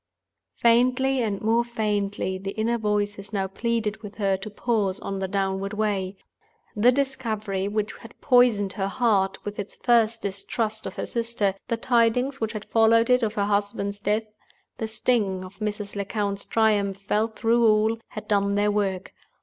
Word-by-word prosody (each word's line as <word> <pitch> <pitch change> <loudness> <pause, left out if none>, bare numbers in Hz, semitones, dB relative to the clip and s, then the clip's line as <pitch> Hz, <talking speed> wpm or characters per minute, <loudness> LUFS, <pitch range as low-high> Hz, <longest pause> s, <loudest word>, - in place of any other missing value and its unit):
Faintly 250 +3 +3
and 205 -4 -1
more 230 +2 +3
faintly 205 -5 -2
the 195 +1 -5
inner 230 +2 0
voices 205 -1 -1
now 195 -2 0
pleaded 220 +2 -2
with 205 -2 -9
her 195 -2 +1
to 195 +3 -7
pause 205 -3 -1
on 195 -1 -4
the 190 - -2
downward 195 +1 -1
way. 200 -3 -1 0.6
The 225 +4 +5
discovery 220 -8 -2
which 210 +1 -2
had 230 - -14
poisoned 240 -7 +4
her 195 0 -2
heart 195 -3 +1
with 205 0 -5
its 205 - -5
first 230 -2 +2
distrust 215 +2 -2
of - - -7
her - - -3
sister; 230 -4 -1
the 230 - -1
tidings 245 +3 +1
which 220 0 -1
had 215 -1 -6
followed 230 +1 +4
it 250 +1 +5
of 220 -1 -1
her 200 - +1
husband's 200 0 -1
death; 210 +2 0 0.6
the 220 - -2
sting 215 -4 0
of 185 - -13
Mrs. 210 -1 -4
Lecount's 200 0 -2
triumph, 205 -3 +2
felt 215 +2 -1
through 235 0 +3
all, 220 +1 +3
had 215 - -8
done 200 -1 +2
their 205 0 +2
work. 195 -3 -2
210 Hz, 165 wpm, -25 LUFS, 200-230 Hz, 0.6 s, The